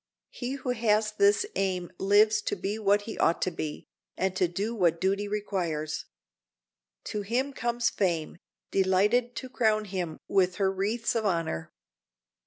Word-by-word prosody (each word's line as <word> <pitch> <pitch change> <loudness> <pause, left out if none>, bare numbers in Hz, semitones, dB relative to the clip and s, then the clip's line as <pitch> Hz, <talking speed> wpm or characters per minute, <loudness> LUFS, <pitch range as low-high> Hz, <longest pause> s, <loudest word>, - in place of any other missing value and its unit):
He 250 +1 -4
who 265 -2 -3
has 215 -2 +2
this 205 - +3
aim 185 -2 -1
lives 210 +2 +4
to - - -1
be 200 +3 -3
what 205 0 +3
he 220 - -7
ought 165 - +3
to 185 - 0
be, 155 -2 -5 0.3
and 190 0 0
to 185 - +2
do 200 +7 -2
what 170 -6 +2
duty 195 +3 0
requires. 175 -7 -2 1.0
To 210 - -3
him 250 +7 -1
comes 240 -1 0
fame, 170 -4 -1 0.3
delighted 205 +6 +2
to 260 - -5
crown 220 -4 +1
him 180 -5 -4
with 185 -2 +2
her 195 -2 +1
wreaths 210 +5 -1
of 220 -2 0
honor. 165 - -2
200 Hz, 155 wpm, -28 LUFS, 185-220 Hz, 1.0 s, lives